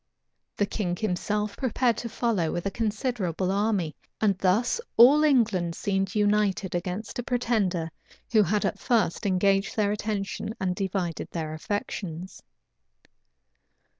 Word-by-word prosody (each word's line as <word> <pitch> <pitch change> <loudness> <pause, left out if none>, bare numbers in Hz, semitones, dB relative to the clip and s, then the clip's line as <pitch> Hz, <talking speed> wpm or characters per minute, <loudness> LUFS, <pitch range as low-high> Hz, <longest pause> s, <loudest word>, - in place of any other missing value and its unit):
The 205 - +2
king 185 -4 -2
himself 210 +2 -1
prepared 250 -1 +1
to 235 - -4
follow 220 -8 0
with 175 - -3
a 195 - 0
considerable 205 -5 -1
army; 200 -5 0 0.2
and 205 -3 +3
thus 220 - +2 0.2
all 275 +6 +8
England 210 - +2
seemed 195 0 -1
united 205 -2 +1
against 185 +6 -4
a - - -2
pretender 210 -10 0 0.4
who 220 -2 +6
had 210 +1 +1
at - - -1
first 220 -5 +1
engaged 195 +1 +2
their 205 -2 +2
attention 210 0 -3
and 185 -1 -1
divided 185 -4 -2
their 155 -2 -4
affections. 185 0 -5
200 Hz, 130 wpm, -27 LUFS, 180-220 Hz, 0.4 s, all